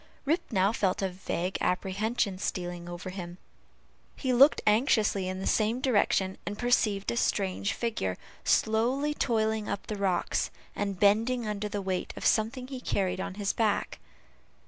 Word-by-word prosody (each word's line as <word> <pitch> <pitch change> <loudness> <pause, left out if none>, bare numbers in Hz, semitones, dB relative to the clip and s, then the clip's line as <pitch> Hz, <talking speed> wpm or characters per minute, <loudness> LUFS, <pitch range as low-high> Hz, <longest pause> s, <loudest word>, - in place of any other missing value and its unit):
Rip 325 +5 +2
now 195 -1 +3
felt 195 -3 0
a 190 - +1
vague 180 0 -3
apprehension 195 +2 0
stealing 175 -2 -4
over 175 +2 -6
him; 175 -2 -7 0.8
he 260 -2 -1
looked 275 +5 +6
anxiously 210 -4 +3
in 185 0 -3
the 190 - -4
same 220 +3 +2
direction, 200 -6 +1
and 205 - -5
perceived 215 -5 +1
a - - -2
strange 200 -2 0
figure 215 - -2 0.3
slowly 250 +7 +2
toiling 220 -5 0
up 200 - -3
the 215 - -4
rocks, 190 -3 0 0.3
and 200 -2 -2
bending 225 +4 +3
under 210 0 -3
the 205 -1 -3
weight 190 -1 -2
of - - -5
something 240 +4 +1
he 260 -2 -6
carried 185 -5 -1
on 190 - -4
his 200 -1 -1
back. 215 -3 0
205 Hz, 155 wpm, -29 LUFS, 190-230 Hz, 0.8 s, looked